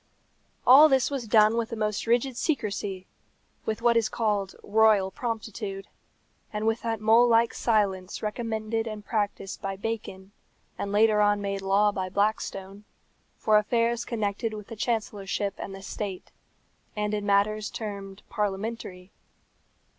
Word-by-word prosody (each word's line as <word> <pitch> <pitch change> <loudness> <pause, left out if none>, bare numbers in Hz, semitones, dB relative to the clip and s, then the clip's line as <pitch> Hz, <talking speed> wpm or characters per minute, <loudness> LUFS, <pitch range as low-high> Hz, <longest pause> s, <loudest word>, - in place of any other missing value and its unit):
All 290 +5 +9
this 265 0 +2
was 265 -5 -3
done 215 0 +5
with 230 -1 -1
the 230 - -4
most 215 0 -2
rigid 245 +2 +2
secrecy, 205 - -2 0.6
with 220 +1 -2
what 235 -1 +4
is 230 -2 +2
called 205 -4 -1
royal 210 -2 +4
promptitude, 215 -4 -5 0.6
and 210 0 -3
with 225 +1 +1
that 225 -1 -2
mole 225 +3 +5
like 230 0 +3
silence 195 -5 0
recommended 225 0 -2
and 215 -1 -6
practised 205 -3 -2
by 195 0 -3
Bacon, 200 -2 -5 0.4
and 200 - -4
later 210 0 +4
on 205 0 +3
made 200 -1 -3
law 200 +2 +3
by 190 -2 -3
Blackstone, 200 0 -2 0.5
for 215 -1 +4
affairs 230 +2 0
connected 215 -1 -2
with 210 0 -9
the 225 - -7
Chancellorship 205 -3 -2
and 195 - -6
the 195 - -11
state, 200 -2 -6 0.6
and 210 0 -1
in 210 -1 -1
matters 205 +1 +1
termed 200 -2 -7
parliamentary. 205 -3 -4
210 Hz, 140 wpm, -27 LUFS, 200-225 Hz, 0.6 s, All